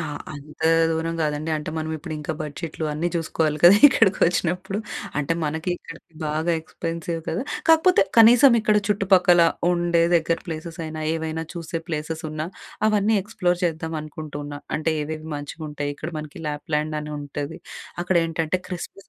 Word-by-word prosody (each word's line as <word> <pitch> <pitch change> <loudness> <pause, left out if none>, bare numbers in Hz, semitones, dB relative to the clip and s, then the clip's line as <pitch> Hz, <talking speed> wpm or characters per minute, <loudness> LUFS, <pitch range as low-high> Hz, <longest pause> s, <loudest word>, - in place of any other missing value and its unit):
ఆ! - - -2 0.3
అంతా 150 +2 -3 0.2
దూరం 165 +1 -1
గాదండి, 150 +1 -1
అంటే, 150 +1 -5
మనమిప్పుడింకా 155 -1 -4
బడ్జెట్‌లు 155 +1 -5
అన్నీ 165 +4 -1
చూసుకోవాలి 160 -2 0
కదా! 180 +4 +9
ఇక్కడికొచ్చినప్పుడు 190 - +1 0.4
అంటే 150 +3 0
మనకీ, 160 +4 -2
ఇక్కడికి 165 0 -13
బాగా 155 +3 0
ఎక్స్‌పెన్సివ్ 165 +1 -4
కదా! 175 +9 -1 0.3
కాకపోతే, 325 +3 +6 0.2
కనీసం 240 +3 +8
ఇక్కడ 215 -1 +3
చుట్టుపక్కల 185 -4 +4 0.3
ఉండే 175 -1 +2
దెగ్గర 165 0 +2
ప్లేసెసైనా, 160 -1 -5
ఏవైనా 160 0 -3
చూసే 165 -1 -4
ప్లేసెసున్నా, 155 0 -4 0.4
అవన్నీ 215 0 +2
ఎక్స్‌ప్లోర్ 180 -4 -1
చేద్దాం 160 -1 -2
అనుకుంటూన్న. 145 -1 -7 0.2
అంటే, 160 +1 0
ఏవేవి 155 +1 -6
మంచిగుంటాయి, 145 0 -5
ఇక్కడ 155 - -5
మనకి 150 +1 -8
ల్యాప్‍ల్యాండ్ 150 +1 -2
అనుంటది, 145 0 -5 0.4
అక్కడేంటంటే 165 -1 +1
క్రిస్మస్ 180 +2 -7
160 Hz, 125 wpm, -23 LUFS, 155-175 Hz, 0.4 s, కదా